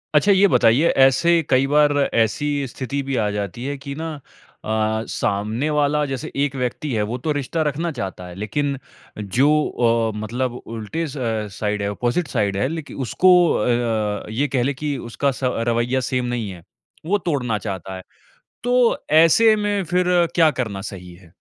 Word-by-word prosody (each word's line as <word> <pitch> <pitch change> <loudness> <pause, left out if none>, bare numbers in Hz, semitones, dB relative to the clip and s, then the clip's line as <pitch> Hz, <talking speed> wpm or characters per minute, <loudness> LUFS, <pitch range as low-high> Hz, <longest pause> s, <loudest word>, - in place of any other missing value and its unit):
अच्छा 200 +7 +5
ये 200 +1 +5
बताइए 125 - +4 0.2
ऐसे 170 +6 +3
कई 130 0 +4
बार 150 +1 +4 0.2
ऐसी 115 +5 +1 0.2
स्थिति 135 +3 -4
भी 135 0 -3
आ 105 - 0
जाती 105 +3 -4
है 140 +1 -3
की 140 +1 -7
ना 160 +2 -5 0.6
अ, 110 0 0
सामने 110 +8 -1
वाला 150 0 +1
जैसे 135 -3 -5
एक 140 -1 -2
व्यक्ति 130 +3 -3
है 110 - 0
वो 120 - -2
तो 150 +5 -2
रिश्ता 145 +3 -2
रखना 155 +3 -2
चाहता 95 -9 -6
है, 90 - -10
लेकिन 135 +8 -2 0.4
जो 110 +8 +2 0.6
अ, - - -7
मतलब 120 +4 -2
उल्टे 115 +9 -4
स 145 - -8 0.4
साइड 105 -1 -1
है, 100 - -1
अपोज़िट 120 - -1
साइड 105 -6 -1
है 115 - +1
लेकि 160 0 -6
उसको 185 - +4 0.2
अ, 110 -3 -1
ये 130 +7 0
कह 130 -3 0
लें 140 +3 0
कि 145 0 -3
उसका 140 +4 0
स 125 - -9 0.3
रवैया 120 +2 +1
सेम 125 -1 -1
नहीं 120 -4 -3
है। 90 -3 -10 0.4
वो 200 +5 +2
तोड़ना 140 - -1
चाहता 95 -2 -6
है। 95 - -7 0.6
तो 245 -1 +3 0.3
ऐसे 220 +7 +5
में 205 -1 0
फिर 180 +1 +1 0.3
क्या 165 -2 +5
करना 105 -5 -3
सही 90 -2 -10
है? 85 -2 -19
130 Hz, 175 wpm, -21 LUFS, 110-150 Hz, 0.6 s, अच्छा